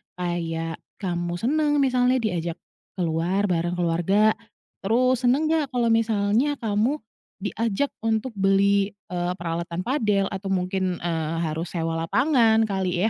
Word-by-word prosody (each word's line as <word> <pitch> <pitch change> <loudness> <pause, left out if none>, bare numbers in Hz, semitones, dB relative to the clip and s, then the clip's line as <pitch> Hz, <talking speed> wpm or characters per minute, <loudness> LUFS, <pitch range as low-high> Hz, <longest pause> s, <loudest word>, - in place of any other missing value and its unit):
Kayak, 165 -2 -3 0.2
kamu 175 -3 -3
senang 295 - +1
misalnya 255 -1 +2
diajak 170 -5 -2 0.4
keluar 175 +3 0
bareng 175 +1 0
keluarga? 175 +5 +2 0.5
Terus, 250 +4 +2
senang 270 +6 +3
nggak 295 -5 0
kalau 235 -2 +2
misalnya 225 +4 +2
kamu 225 +2 0 0.5
diajak 230 +5 -1
untuk 225 +2 -1
beli, 200 0 +2 0.2
eee, 175 0 -1
peralatan 170 0 -4
padel? 210 -6 +1
Atau 195 0 -5
mungkin, 185 -1 -1
eee, 165 -1 -1
harus 160 +1 -2
sewa 165 -2 -2
lapangan, 225 - +3
kali, 190 -3 -1
195 Hz, 125 wpm, -24 LUFS, 175-230 Hz, 0.5 s, senang